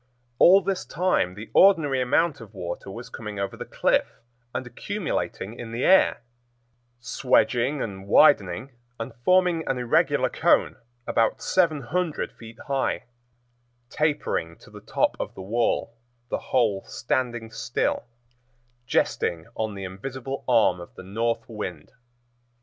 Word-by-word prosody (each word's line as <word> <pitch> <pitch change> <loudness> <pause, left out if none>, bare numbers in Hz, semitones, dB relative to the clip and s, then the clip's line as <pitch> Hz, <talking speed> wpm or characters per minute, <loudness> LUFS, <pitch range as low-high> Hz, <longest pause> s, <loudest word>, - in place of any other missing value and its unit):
All 190 +3 +8
this 190 0 -1
time 175 - 0
the 110 +2 -9
ordinary 160 -9 +5
amount 145 +3 +1
of 110 - -13
water 85 +2 -6
was 115 +5 -8
coming 105 -2 -7
over 100 -1 -3
the - - -7
cliff - - 0 0.3
and - - -4
accumulating 110 +5 -4
in 115 -2 -7
the 120 - -2
air, 190 -9 +5 0.8
swedging 125 +2 +1
and 95 -2 -7
widening 105 - +4 0.3
and 115 - -5
forming 180 -1 +3
an 135 - 0
irregular 125 -1 +2
cone - - +2 0.3
about 115 -1 +1
seven 165 -6 +2
hundred 165 +5 -2
feet 115 0 -13
high, 135 -1 -1 0.9
tapering 145 - -1
to - - -18
the - - -11
top - - 0
of - - -5
the 95 - -8
wall, 115 +2 0 0.4
the - - -1
whole 110 -7 +2
standing 120 -2 -2
still, - - -1 0.8
jesting 80 -2 0
on 110 -2 -3
the 100 - -6
invisible 130 +8 -6
arm 115 -7 +4
of 85 - -12
the - - -10
North 115 +5 -2
Wind. 95 -9 -6
120 Hz, 135 wpm, -25 LUFS, 100-140 Hz, 0.9 s, All